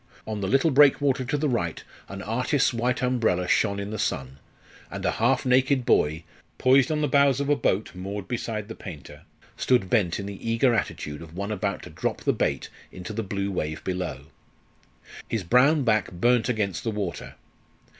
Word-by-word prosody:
On 110 Hz, -2 st, -4 dB
the 95 Hz, -, -1 dB
little 135 Hz, -, +3 dB
breakwater 140 Hz, -1 st, +4 dB
to 145 Hz, -, -1 dB
the 150 Hz, +1 st, 0 dB
right 85 Hz, -, -2 dB, 0.3 s
an 100 Hz, 0 st, -7 dB
artist's 125 Hz, +5 st, +1 dB
white 125 Hz, +2 st, -1 dB
umbrella 110 Hz, -8 st, +1 dB
shone 100 Hz, 0 st, +2 dB
in 100 Hz, +1 st, -5 dB
the 110 Hz, -, -4 dB
sun; 65 Hz, 0 st, -3 dB, 0.5 s
and -, -, -6 dB
a -, -, +2 dB
half 120 Hz, +5 st, +1 dB
naked 130 Hz, 0 st, +3 dB
boy, 80 Hz, -4 st, +2 dB, 0.3 s
poised 130 Hz, +2 st, +4 dB
on 150 Hz, -1 st, 0 dB
the 150 Hz, -, +2 dB
bows 140 Hz, -1 st, +3 dB
of 140 Hz, 0 st, -1 dB
a 145 Hz, -, +4 dB
boat 105 Hz, -6 st, -1 dB
moored 95 Hz, +2 st, -6 dB
beside 110 Hz, -3 st, -3 dB
the 115 Hz, -, -6 dB
painter, 85 Hz, -10 st, -10 dB, 0.3 s
stood 120 Hz, -8 st, +1 dB
bent 100 Hz, -8 st, +2 dB
in 100 Hz, -, -5 dB
the 100 Hz, +3 st, -6 dB
eager 115 Hz, +2 st, +3 dB
attitude 75 Hz, -8 st, -3 dB
of 80 Hz, 0 st, -11 dB
one 100 Hz, +3 st, -4 dB
about 100 Hz, -3 st, -2 dB
to -, -, -10 dB
drop -, -, -3 dB
the -, -, +1 dB
bait -, -, -1 dB, 0.2 s
into 90 Hz, +4 st, -7 dB
the 115 Hz, -, -2 dB
blue 100 Hz, -1 st, -3 dB
wave 80 Hz, -4 st, -3 dB
below. 90 Hz, -7 st, -4 dB, 1.0 s
His 115 Hz, -4 st, -1 dB
brown 135 Hz, -, +4 dB
back 110 Hz, -5 st, +1 dB
burnt 120 Hz, +6 st, +2 dB
against 105 Hz, -6 st, -1 dB
the 115 Hz, -, -1 dB
water. 100 Hz, -6 st, -4 dB
110 Hz, 185 wpm, -25 LUFS, 95-125 Hz, 1.0 s, breakwater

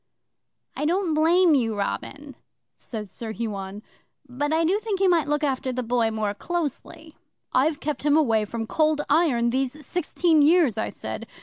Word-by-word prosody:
'"I 295 Hz, -, -2 dB
don't 350 Hz, +1 st, +1 dB
blame 330 Hz, +2 st, +4 dB
you, 230 Hz, -6 st, +1 dB
Robin," 280 Hz, +7 st, -4 dB, 0.4 s
says 210 Hz, -5 st, -6 dB
Sir 220 Hz, +1 st, -6 dB
Huon, 205 Hz, -2 st, -5 dB, 0.4 s
"but 285 Hz, +4 st, -3 dB
I 325 Hz, +1 st, +2 dB
do 385 Hz, +5 st, +2 dB
think 430 Hz, -3 st, -3 dB
you 390 Hz, -, +3 dB
might 335 Hz, -5 st, +3 dB
look 295 Hz, +1 st, 0 dB
after 265 Hz, -2 st, -1 dB
the 255 Hz, 0 st, -3 dB
Boy 235 Hz, -1 st, +1 dB
more 215 Hz, -2 st, -2 dB
closely." 315 Hz, -, -5 dB, 0.4 s
'"I've 290 Hz, +3 st, +2 dB
kept 300 Hz, 0 st, -3 dB
him 295 Hz, +1 st, +3 dB
away 225 Hz, -8 st, +2 dB
from 225 Hz, +2 st, -4 dB
Cold 305 Hz, +5 st, +1 dB
Iron 270 Hz, -7 st, +3 dB
these 270 Hz, +3 st, -2 dB
sixteen 335 Hz, -1 st, +1 dB
years," 310 Hz, -, +4 dB
I 220 Hz, -, -2 dB
said. -, -, -7 dB
290 Hz, 170 wpm, -24 LUFS, 235-320 Hz, 0.4 s, blame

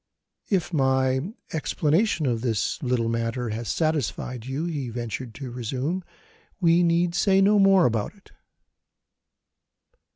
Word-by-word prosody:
"If 185 Hz, -3 st, 0 dB
my 130 Hz, +3 st, +1 dB, 0.2 s
explanation 160 Hz, +3 st, +1 dB
of 120 Hz, -4 st, 0 dB
this 115 Hz, -, -1 dB
little 125 Hz, -4 st, 0 dB
matter 115 Hz, +1 st, -2 dB
has 110 Hz, +2 st, -4 dB
satisfied 135 Hz, -6 st, -2 dB
you," 140 Hz, +5 st, -2 dB
he 145 Hz, -7 st, -3 dB
ventured 120 Hz, 0 st, -5 dB
to 130 Hz, 0 st, -7 dB
resume, 130 Hz, +9 st, -3 dB, 0.6 s
"we 170 Hz, -1 st, +4 dB
need 170 Hz, 0 st, +2 dB
say 190 Hz, +1 st, +3 dB
no 205 Hz, +2 st, +5 dB
more 195 Hz, -2 st, +5 dB
about 115 Hz, -, -1 dB
it." 200 Hz, -, -22 dB
135 Hz, 125 wpm, -25 LUFS, 120-170 Hz, 0.6 s, no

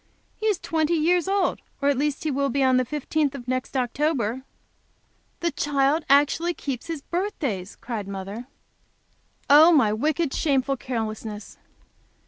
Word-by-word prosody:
He 435 Hz, -, -2 dB
is 420 Hz, -4 st, +2 dB
twenty 320 Hz, -1 st, 0 dB
years 345 Hz, +3 st, +2 dB
old; 390 Hz, -2 st, +1 dB, 0.2 s
or 280 Hz, -, 0 dB
at 285 Hz, -, +3 dB
least 290 Hz, +2 st, -1 dB
he 310 Hz, -, 0 dB
will 275 Hz, +1 st, 0 dB
be 275 Hz, 0 st, +1 dB
on 260 Hz, -1 st, +4 dB
the 255 Hz, -, +2 dB
fifteenth 295 Hz, 0 st, -1 dB
of 245 Hz, -3 st, -9 dB
next 255 Hz, +1 st, -2 dB
October." 255 Hz, -2 st, 0 dB, 1.0 s
"The 340 Hz, -1 st, +1 dB
child 290 Hz, +2 st, +1 dB
actually 295 Hz, +5 st, +3 dB
keeps 265 Hz, -4 st, -5 dB
his 325 Hz, -4 st, -5 dB
birthdays!" 285 Hz, -, -3 dB
cried 220 Hz, -5 st, -5 dB
mother. 200 Hz, +5 st, -6 dB, 1.0 s
"Oh, 305 Hz, +4 st, +8 dB
my 260 Hz, -10 st, +4 dB
wicked, 300 Hz, +5 st, 0 dB
shameful 275 Hz, -3 st, +1 dB
carelessness." 220 Hz, -4 st, -5 dB
280 Hz, 145 wpm, -24 LUFS, 245-315 Hz, 1.0 s, Oh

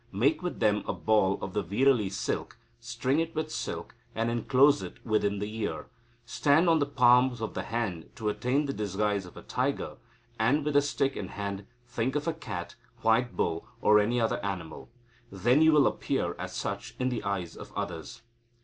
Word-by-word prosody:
Make 140 Hz, +11 st, +2 dB
with 180 Hz, -1 st, -4 dB
them 105 Hz, -1 st, +2 dB
a -, -, 0 dB
ball 105 Hz, -3 st, +2 dB
of 95 Hz, -, -4 dB
the 105 Hz, -, +1 dB
veerali 105 Hz, +3 st, +2 dB
silk, 100 Hz, -, -3 dB, 0.2 s
string 120 Hz, +5 st, -1 dB
it 165 Hz, 0 st, -2 dB
with 155 Hz, 0 st, -2 dB
silk, -, -, -4 dB, 0.2 s
and 115 Hz, +1 st, 0 dB
enclose 130 Hz, +5 st, +4 dB
it -, -, -7 dB
within 105 Hz, -2 st, +1 dB
the 105 Hz, +2 st, -4 dB
ear. 110 Hz, -, -3 dB, 0.4 s
Stand 145 Hz, +7 st, +3 dB
on 165 Hz, -1 st, +5 dB
the 145 Hz, -, +1 dB
palms 125 Hz, -2 st, +4 dB
of 110 Hz, -1 st, -4 dB
the -, -, -2 dB
hand 110 Hz, -8 st, -3 dB
to 110 Hz, -, -4 dB
attain 125 Hz, +7 st, +1 dB
the 140 Hz, -, -2 dB
disguise 105 Hz, -2 st, -1 dB
of -, -, -14 dB
a -, -, -10 dB
tiger, 125 Hz, +5 st, -2 dB, 0.4 s
and, 135 Hz, +7 st, +2 dB
with 150 Hz, -, 0 dB
the 145 Hz, -, +6 dB
stick 140 Hz, -1 st, 0 dB
in -, -, -4 dB
hand, 100 Hz, -1 st, -5 dB, 0.2 s
think 120 Hz, +2 st, -2 dB
of 150 Hz, +1 st, -1 dB
a 165 Hz, -, +1 dB
cat, 105 Hz, -, -6 dB, 0.3 s
white 115 Hz, +2 st, +2 dB
bull, 85 Hz, +5 st, -1 dB
or 105 Hz, -1 st, +5 dB
any 115 Hz, +4 st, +1 dB
other 115 Hz, -1 st, 0 dB
animal. 95 Hz, -3 st, -5 dB, 0.4 s
Then 120 Hz, +9 st, +3 dB
you 160 Hz, 0 st, +7 dB
will 150 Hz, -3 st, +5 dB
appear -, -, 0 dB
as -, -, -5 dB
such -, -, -4 dB
in 130 Hz, 0 st, 0 dB
the 120 Hz, -3 st, -3 dB
eyes 95 Hz, -4 st, -3 dB
of -, -, -10 dB
others. 120 Hz, +9 st, -5 dB
115 Hz, 195 wpm, -29 LUFS, 105-140 Hz, 0.4 s, you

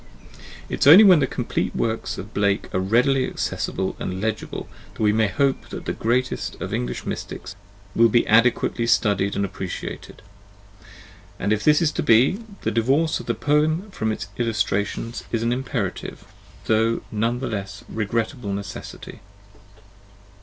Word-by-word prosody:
It -, -, -4 dB
is -, -, +3 dB
only 175 Hz, +9 st, +10 dB
when 185 Hz, -6 st, +7 dB
the 135 Hz, -, +1 dB
complete 125 Hz, -, -2 dB
works 115 Hz, 0 st, -2 dB
of 105 Hz, +3 st, -8 dB
Blake 100 Hz, -1 st, 0 dB
are -, -, +1 dB
readily 125 Hz, +7 st, +2 dB
accessible 95 Hz, -, -3 dB
and 95 Hz, 0 st, -4 dB
legible 110 Hz, +1 st, -3 dB, 0.3 s
that -, -, -3 dB
we 105 Hz, 0 st, +4 dB
may 110 Hz, 0 st, +3 dB
hope 135 Hz, +5 st, 0 dB
that -, -, -7 dB
the -, -, -2 dB
greatest 125 Hz, +3 st, -1 dB
of -, -, -5 dB
English 60 Hz, 0 st, -3 dB
mystics -, -, -6 dB, 0.4 s
will 115 Hz, 0 st, +5 dB
be 120 Hz, +2 st, +3 dB
adequately 115 Hz, +1 st, +3 dB
studied 100 Hz, -4 st, +2 dB
and 100 Hz, -, 0 dB
appreciated; 95 Hz, -1 st, -7 dB, 1.1 s
and 105 Hz, -, 0 dB
if 110 Hz, -, -2 dB
this 150 Hz, +2 st, +4 dB
is 155 Hz, -, +2 dB
to -, -, -2 dB
be, 125 Hz, -, +4 dB, 0.2 s
the -, -, 0 dB
divorce 135 Hz, +9 st, +1 dB
of -, -, -10 dB
the 115 Hz, -, 0 dB
poem 155 Hz, -, +1 dB
from 110 Hz, -10 st, -2 dB
its 100 Hz, -1 st, -5 dB
illus 115 Hz, -3 st, +1 dB
trations 105 Hz, +4 st, -3 dB
is 115 Hz, -1 st, -1 dB
an 120 Hz, +1 st, +1 dB
imperative, 125 Hz, -6 st, -4 dB, 0.4 s
though 115 Hz, +1 st, +2 dB
none 115 Hz, +3 st, 0 dB
the 135 Hz, -, -3 dB
less 100 Hz, -1 st, -5 dB
regrettable 110 Hz, 0 st, -2 dB
necessity. 100 Hz, -1 st, -7 dB
115 Hz, 160 wpm, -23 LUFS, 105-130 Hz, 1.1 s, only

